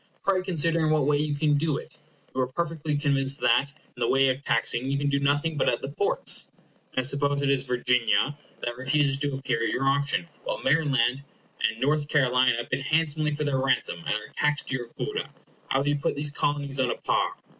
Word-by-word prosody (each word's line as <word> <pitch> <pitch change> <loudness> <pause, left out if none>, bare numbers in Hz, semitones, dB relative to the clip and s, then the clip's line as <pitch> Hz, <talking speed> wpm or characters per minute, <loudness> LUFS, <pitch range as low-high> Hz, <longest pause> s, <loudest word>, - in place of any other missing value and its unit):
Pray 195 -2 +2
consider 165 -3 +1
in 155 - +2
what 155 -3 +2
way 145 0 +3
you 150 0 -1
can 150 0 +1
do 155 0 0
it. - - -11 0.3
You 130 - 0
are 130 - 0
perfectly 155 +1 -2
convinced 140 -2 +1
that, 125 +4 +3 0.2
in - - -14
the 115 - +1
way 135 +1 +3
of 130 +2 -2
taxing, 120 +2 +1
you 140 - 0
can 145 0 0
do 140 0 +1
nothing 145 +3 0
but - - +2
at - - -2
the 135 - -3
ports. 175 +8 +1 0.5
Now 130 - +2
suppose 140 +1 +1
it 140 - +2
is 135 -1 +1
Virginia 125 -1 +1 0.3
that 120 0 -3
refuses 135 +2 +2
to 145 -1 -2
appear 135 0 -2
at - - +1
your 135 - -1
auction, 140 +4 +1 0.2
while - - -3
Maryland 140 - +2 0.5
and 110 - -8
North 145 +3 +1
Carolina 125 -4 +2
bid 130 - 0
handsomely 155 +1 0
for 150 0 -2
their 140 -3 0
ransom, 135 +1 0
and 140 - +1
are 105 0 -7
taxed 150 0 0
to - - -1
your 120 -2 -5
quota, - - -4 0.4
how 135 - +2
will 140 - -2
you 145 0 +2
put - - -1
these 145 0 +1
Colonies 145 -1 -1
on 130 -2 +2
a - - -1
par? - - 0
140 Hz, 220 wpm, -26 LUFS, 130-150 Hz, 0.5 s, way